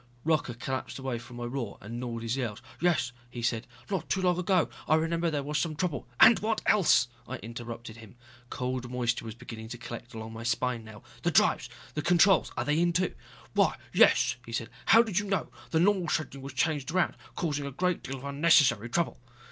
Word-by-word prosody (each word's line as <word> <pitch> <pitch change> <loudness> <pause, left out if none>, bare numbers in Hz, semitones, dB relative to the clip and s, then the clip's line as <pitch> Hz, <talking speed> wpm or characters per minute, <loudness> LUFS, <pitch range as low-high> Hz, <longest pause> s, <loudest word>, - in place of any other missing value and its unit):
Rocca 155 -6 +1
collapsed 130 +2 -4
away 130 -3 -3
from 120 +1 -12
my 120 - -5
roar 120 -3 -4
and 115 +4 -7
gnawed 120 -2 -4
his 115 +2 -1
nails. 120 -6 -3 0.2
"Yes 170 -8 +2
" 120 - -28
he 120 -1 -7
said, 115 -1 0 0.2
"not 185 -5 -2
too 190 - +1
long 180 -1 +2
ago. 180 -2 +2 0.2
I 155 - +5
remember 165 +1 +1
there 145 -3 -1
was 150 +1 -1
some 160 -3 -1
trouble...." 150 -7 -2
"And 235 - +8
what 220 +1 0
else!" 170 - +5 0.2
I - - -4
interrupted 115 0 -8
him. 110 -2 -13 0.3
Cold 125 -1 -3
moisture 120 -2 -1
was 110 -1 -6
beginning 110 -1 -9
to 120 +2 -7
collect 120 +1 -8
along 110 0 -7
my 115 - -7
spine 120 0 -1
now. 110 -1 -12 0.2
"The - - +1
drives, - - +3 0.3
controls 175 +4 +4
are - - -1
they 150 +2 +2
in, 175 0 +2
too?" 180 +2 +1 0.4
"Why, - - +3 0.2
yes," - - +5
he 115 - -10
said. 115 0 -3 0.2
"How 225 +2 +8
did 210 -5 0
you 205 - -3
know? 195 -1 -1 0.2
The 160 - +2
normal 185 0 +3
scheduling 140 -3 -2
was 135 0 -7
changed 145 -1 0
around, 185 +3 +1 0.2
causing 145 -4 -2
a - - -5
great 180 +5 0
deal 135 - -5
of 130 - -12
unnecessary 140 -6 +4
trouble." 170 +2 0
135 Hz, 210 wpm, -29 LUFS, 120-170 Hz, 0.4 s, And